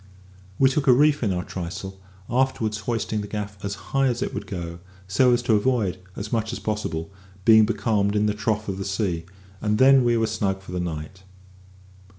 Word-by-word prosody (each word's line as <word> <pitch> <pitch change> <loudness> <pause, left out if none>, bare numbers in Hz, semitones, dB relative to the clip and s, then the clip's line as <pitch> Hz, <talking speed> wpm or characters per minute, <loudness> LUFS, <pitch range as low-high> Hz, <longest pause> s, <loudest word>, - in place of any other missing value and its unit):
We 135 - +5
took 135 +2 0
a 130 - +8
reef 150 +3 +4
in 105 -5 +1
our 90 -1 -1
trysail, 95 +2 -6 0.3
afterwards 120 -4 0
hoisting 110 -2 -1
the 105 - -6
gaff 105 -1 -6
as 100 0 -3 0.2
high 135 0 +3
as 120 -2 0
it - - -4
would - - -5
go, 85 -3 -5 0.3
so 125 +7 +4
as 120 0 +2
to 120 -2 +2
avoid, 105 -4 +1 0.2
as 105 +3 -5
much 110 -1 0
as - - -4
possible, 100 -6 -3 0.3
being 110 -1 +7
becalmed 105 -2 +1
in 105 0 +2
the 105 - +1
trough 110 0 -1
of 95 -1 -3
the - - -2
sea, 95 -4 -1 0.4
and 105 0 +1
then 135 +1 +6
we 120 -1 +3
were 115 - +2
snug 100 -3 -2
for 90 - -10
the 90 - -2
night. 85 +2 -5
105 Hz, 200 wpm, -24 LUFS, 95-120 Hz, 0.4 s, a